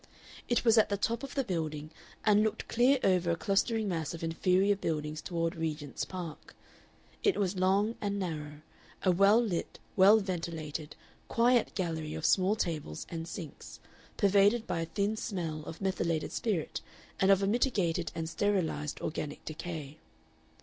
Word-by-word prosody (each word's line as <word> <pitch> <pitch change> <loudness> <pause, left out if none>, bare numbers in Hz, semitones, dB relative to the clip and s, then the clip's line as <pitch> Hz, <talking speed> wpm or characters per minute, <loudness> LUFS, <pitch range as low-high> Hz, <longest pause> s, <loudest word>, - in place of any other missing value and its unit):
It 240 0 +1
was 225 -1 +6
at 215 - +3
the 200 - 0
top 230 +4 -1
of 275 -1 -7
the 275 - +1
building, 155 - -3 0.3
and 210 -1 +5
looked 220 0 -1
clear 250 +4 +4
over 180 -2 +3
a 170 - +2
clustering 210 +5 +1
mass 165 -4 -2
of 165 - -8
inferior 185 +5 +2
buildings 155 -4 -3
toward 165 -2 -2
Regent's 155 -3 -3
Park. 175 -4 -8 0.7
It 405 - +2
was 190 -2 0
long 195 +4 +3
and 200 -1 -1
narrow, 150 -5 -4 0.4
a 185 - +4
well 200 +5 +5
lit, 205 -8 -2 0.2
well 200 +3 +7
ventilated, 165 -6 -4 0.3
quiet 240 0 +3
gallery 160 -4 -2
of 160 - -4
small 190 +2 +4
tables 155 - -3
and 165 -1 -5
sinks, 165 -4 -8 0.4
pervaded 205 +3 +4
by 165 - -2
a - - -1
thin 200 +5 -1
smell 165 -8 -3
of 165 - -8
methylated 170 -4 -1
spirit 200 -9 -2 0.4
and 190 - +3
of 195 0 +5
a - - +2
mitigated 195 - +1
and 160 -1 -3
sterilized 165 -6 -1
organic 150 -1 -4
decay. 155 -2 -6
180 Hz, 155 wpm, -31 LUFS, 160-205 Hz, 0.7 s, well